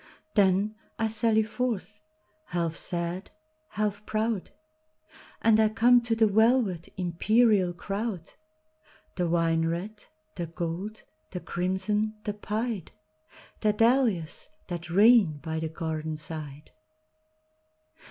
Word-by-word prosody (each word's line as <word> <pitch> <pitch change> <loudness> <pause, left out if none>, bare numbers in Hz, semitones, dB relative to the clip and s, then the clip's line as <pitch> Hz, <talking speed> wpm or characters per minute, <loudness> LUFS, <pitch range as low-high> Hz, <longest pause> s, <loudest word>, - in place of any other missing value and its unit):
Then, 200 +1 +3 0.2
I 225 - +1
sally 220 0 +2
forth, 220 -2 -3 0.4
half 170 -2 -2
sad, 175 +2 -4 0.4
half 210 -3 -2
proud, 220 -2 -1 0.9
And 220 -1 +5
I 220 -1 +5
come 240 +3 +5
to 235 -1 0
the 225 0 +4
velvet, 220 -4 +2
imperial 190 +2 +3
crowd, 195 0 -4 0.8
The 175 -2 0
wine 165 -1 +2
red, 195 +6 -4 0.3
the 170 -2 -4
gold, 175 +6 -5 0.3
the 180 - -5
crimson, 190 +5 -1
the 210 - -2
pied,—The 210 -1 -4
dahlias 225 - +1 0.2
that 175 -1 -5
reign 200 -3 +5
by 160 +1 -4
the 160 0 -3
garden 160 -1 -4
side. 150 -2 -8
200 Hz, 105 wpm, -28 LUFS, 170-220 Hz, 0.9 s, And